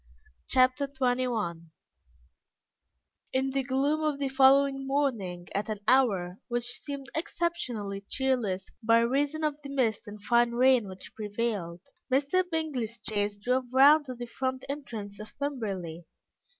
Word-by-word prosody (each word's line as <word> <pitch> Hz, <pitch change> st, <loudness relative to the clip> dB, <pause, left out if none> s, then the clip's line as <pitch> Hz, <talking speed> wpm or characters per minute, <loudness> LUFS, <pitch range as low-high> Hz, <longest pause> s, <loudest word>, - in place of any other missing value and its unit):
Chapter 255 Hz, +2 st, +3 dB
XXI 245 Hz, -10 st, -1 dB, 1.7 s
In 265 Hz, +1 st, +1 dB
the 270 Hz, 0 st, 0 dB
gloom 275 Hz, +4 st, +1 dB
of 305 Hz, -2 st, 0 dB
the 280 Hz, -1 st, -1 dB
following 270 Hz, 0 st, +4 dB
morning, 225 Hz, -11 st, -1 dB
at 210 Hz, +2 st, -2 dB
an 215 Hz, -1 st, -3 dB
hour 195 Hz, -9 st, +3 dB
which 240 Hz, 0 st, -1 dB, 0.2 s
seemed 280 Hz, -2 st, -7 dB
exceptionally 260 Hz, -, -2 dB
cheerless 245 Hz, -9 st, -1 dB
by 230 Hz, +1 st, +4 dB
reason 285 Hz, +6 st, 0 dB
of 300 Hz, -1 st, 0 dB
the 280 Hz, -, -8 dB
mist 235 Hz, -5 st, 0 dB
and 210 Hz, +1 st, -8 dB
fine 235 Hz, 0 st, +3 dB
rain 250 Hz, -2 st, +4 dB
which 185 Hz, 0 st, -10 dB
prevailed, 205 Hz, -5 st, -3 dB, 0.3 s
Mr. 285 Hz, +8 st, +3 dB
Bingley's 270 Hz, -9 st, -2 dB
chaise 205 Hz, -1 st, -1 dB
drove 250 Hz, +5 st, 0 dB
round 285 Hz, +3 st, +7 dB
to 255 Hz, -2 st, -6 dB
the 240 Hz, 0 st, -6 dB
front 260 Hz, +2 st, -3 dB
entrance 225 Hz, -8 st, -6 dB
of 215 Hz, -, -11 dB
Pemberley. 195 Hz, -, -4 dB
255 Hz, 135 wpm, -29 LUFS, 210-275 Hz, 1.7 s, round